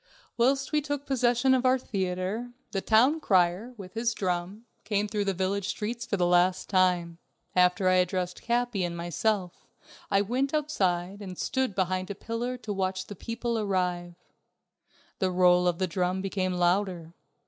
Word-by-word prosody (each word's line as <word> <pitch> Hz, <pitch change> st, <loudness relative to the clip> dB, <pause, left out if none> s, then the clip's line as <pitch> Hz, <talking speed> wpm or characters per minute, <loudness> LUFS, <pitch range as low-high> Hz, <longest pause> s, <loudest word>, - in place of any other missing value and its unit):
Whilst 270 Hz, +3 st, +2 dB
we 300 Hz, -1 st, +2 dB
took 290 Hz, -1 st, -4 dB
possession 250 Hz, 0 st, +2 dB
of 255 Hz, -1 st, +2 dB
our 255 Hz, 0 st, +4 dB
theater, 195 Hz, +2 st, -3 dB, 0.2 s
the 195 Hz, -, -1 dB
town 250 Hz, +10 st, +4 dB
crier, 190 Hz, -, +1 dB
with 185 Hz, -3 st, -10 dB
his 230 Hz, 0 st, 0 dB
drum, 185 Hz, +4 st, -3 dB, 0.2 s
came 205 Hz, -1 st, 0 dB
through 205 Hz, 0 st, -2 dB
the 195 Hz, -, +1 dB
village 190 Hz, +2 st, -1 dB
streets 230 Hz, +3 st, -4 dB
for 200 Hz, -, -1 dB
the 180 Hz, -, +2 dB
last 180 Hz, +1 st, +2 dB
time. 180 Hz, -3 st, +2 dB, 0.4 s
After 180 Hz, +1 st, +3 dB
I 185 Hz, 0 st, +5 dB
had 180 Hz, 0 st, +3 dB
dressed 180 Hz, 0 st, -3 dB
Capi 240 Hz, -4 st, 0 dB
and 170 Hz, -1 st, -3 dB
myself, 180 Hz, +2 st, -2 dB, 0.4 s
I 195 Hz, -1 st, +3 dB
went 260 Hz, +8 st, 0 dB
outside 195 Hz, -10 st, -1 dB
and 185 Hz, -3 st, -7 dB
stood 260 Hz, -6 st, -1 dB
behind 185 Hz, 0 st, -1 dB
a 200 Hz, -, -4 dB
pillar 235 Hz, +4 st, -4 dB
to 220 Hz, -4 st, -5 dB
watch 190 Hz, -1 st, -2 dB
the 205 Hz, -, -9 dB
people 230 Hz, +3 st, -3 dB
arrive. 180 Hz, -4 st, -1 dB, 1.0 s
The 190 Hz, -, +1 dB
roll 180 Hz, 0 st, +4 dB
of 175 Hz, -1 st, +1 dB
the 185 Hz, -, +1 dB
drum 180 Hz, +1 st, -1 dB
became 190 Hz, -1 st, -1 dB
louder. 175 Hz, -1 st, 0 dB
195 Hz, 170 wpm, -28 LUFS, 180-235 Hz, 1.0 s, I